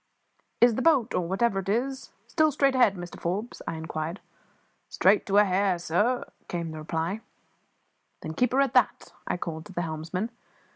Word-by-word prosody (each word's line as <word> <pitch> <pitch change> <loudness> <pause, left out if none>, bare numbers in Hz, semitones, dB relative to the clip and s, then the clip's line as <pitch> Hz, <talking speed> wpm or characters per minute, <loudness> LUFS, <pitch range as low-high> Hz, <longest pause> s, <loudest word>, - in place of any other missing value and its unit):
"Is 240 0 +7
the 260 - -1
boat 270 -6 +3
or 175 - 0
whatever 195 +2 +1
it 195 0 -5
is 265 +5 -1 0.2
still 310 -1 +2
straight 275 -1 +2
ahead, 245 -6 +4
Mr 175 -1 -8
Forbes?" 200 +8 -3
I - - -2
inquired. 160 +2 -4 0.7
"Straight 200 +3 +3
to 200 0 +2
a 210 - +8
hair, 190 -1 +2
sir," 205 +9 0 0.2
came 170 -2 -3
the 155 - -7
reply. 165 +6 -2 1.0
"Then 160 - -4
keep 245 +8 +1
her 270 - +4
at 275 -3 +1
that," 250 -4 +2
I - - -1
called 160 -1 -5
to 195 - -12
the 175 - -1
helmsman. 165 +7 -3
195 Hz, 180 wpm, -27 LUFS, 170-240 Hz, 1.0 s, a